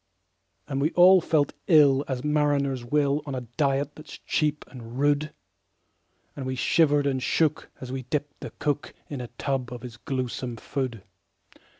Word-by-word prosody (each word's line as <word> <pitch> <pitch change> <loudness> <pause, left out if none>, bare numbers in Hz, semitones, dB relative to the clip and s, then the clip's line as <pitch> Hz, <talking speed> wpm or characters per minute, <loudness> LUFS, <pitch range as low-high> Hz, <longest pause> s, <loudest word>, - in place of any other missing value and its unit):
And 135 -1 -2
we 150 - +3
all 185 +1 +7
felt 155 -4 +1
ill 145 -4 +6
as 130 -2 -3
mariners 145 -3 +1
will, 145 +3 +1
On 140 - -3
a 130 - -3
diet 140 +3 -1
that's 155 -1 -11
cheap 150 -1 -1
and 120 -2 -10
rude; 145 +2 +1 1.0
And 135 -2 -5
we 130 - -2
shivered 145 +2 +3
and 135 -2 0
shook 155 +3 +1
as 130 -1 -7
we 130 0 -3
dipped 145 +3 -4
the - - -6
cook 145 0 -2 0.2
In 140 -3 -4
a 120 - -6
tub 130 -3 -2
of 120 -1 -7
his 120 -3 -8
gluesome 125 -1 -4
food. 120 -4 -4
140 Hz, 165 wpm, -26 LUFS, 130-150 Hz, 1.0 s, all